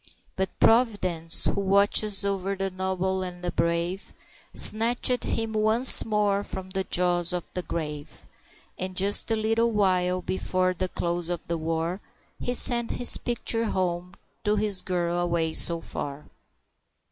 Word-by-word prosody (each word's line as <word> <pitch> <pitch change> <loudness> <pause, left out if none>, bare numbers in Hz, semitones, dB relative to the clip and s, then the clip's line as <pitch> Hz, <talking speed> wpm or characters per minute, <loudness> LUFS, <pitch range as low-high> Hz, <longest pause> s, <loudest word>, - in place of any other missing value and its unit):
But 190 0 -5
Providence, 195 -9 +4
who 200 - -1
watches 200 +1 +2
o'er 195 0 -3
the 195 0 -4
noble 190 0 -3
and 180 -1 -8
the 175 - -3
brave, 170 +3 -3 0.4
Snatched 240 +3 +4
him 225 -1 -4
once 220 +4 +6
more 205 -2 -1
from 190 -2 -9
the 190 0 -3
jaws 175 -1 0
of 175 -1 -5
the 180 - -4
grave; 150 -3 -8 0.5
And 185 0 -6
just 200 +4 +1
a 225 - +1
little 225 +2 -1
while 185 -3 -1
before 185 0 -2
the 185 +1 -5
close 175 0 -4
of 175 -2 -4
the 170 -1 -4
war, 165 +4 -4 0.4
He 245 - -3
sent 235 -1 +5
his 245 - +5
picture 230 -1 -3
home 180 -2 -4 0.3
to 210 -1 0
his 205 -2 +1
girl 175 -1 -3
away 170 -2 -2
so 170 0 +2
far. 145 -2 -8
185 Hz, 145 wpm, -24 LUFS, 175-210 Hz, 0.5 s, once